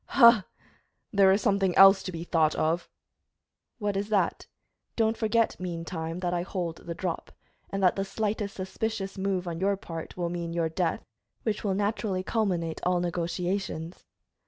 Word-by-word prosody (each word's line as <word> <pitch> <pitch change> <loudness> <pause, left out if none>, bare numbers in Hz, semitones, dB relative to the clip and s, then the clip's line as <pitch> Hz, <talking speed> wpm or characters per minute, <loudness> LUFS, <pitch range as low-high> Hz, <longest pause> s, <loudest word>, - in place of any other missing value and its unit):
"Ha! 235 -6 +6 0.7
there 195 -1 +6
is 195 +1 +2
something 195 -3 +2
else 195 0 +9
to 185 - -5
be 165 -1 -5
thought 160 -3 +2
of." 165 +2 0 0.9
"What 205 -3 -1
is 200 +2 -2
that? 205 -3 +1 0.5
Don't 225 -1 +2
forget, 225 0 +1
mean 170 -2 -4
time, 165 +1 -4
that 175 -1 -1
I 175 - 0
hold 175 -2 -3
the 170 - -7
drop, 175 -2 -4 0.4
and 195 0 -2
that 180 - +5
the 195 - -1
slightest 205 0 -2
suspicious 195 +1 -3
move 190 -2 -1
on 165 -1 -4
your 200 +1 +1
part 165 -3 -7
will 175 -1 -1
mean 170 -1 -4
your 165 -1 0
death, 170 +1 -1 0.4
which 215 -2 -1
will 195 -3 0
naturally 205 -2 -1
culminate 180 -7 -1
all 180 0 +2
negotiations." 175 0 -3
185 Hz, 165 wpm, -28 LUFS, 170-200 Hz, 0.9 s, else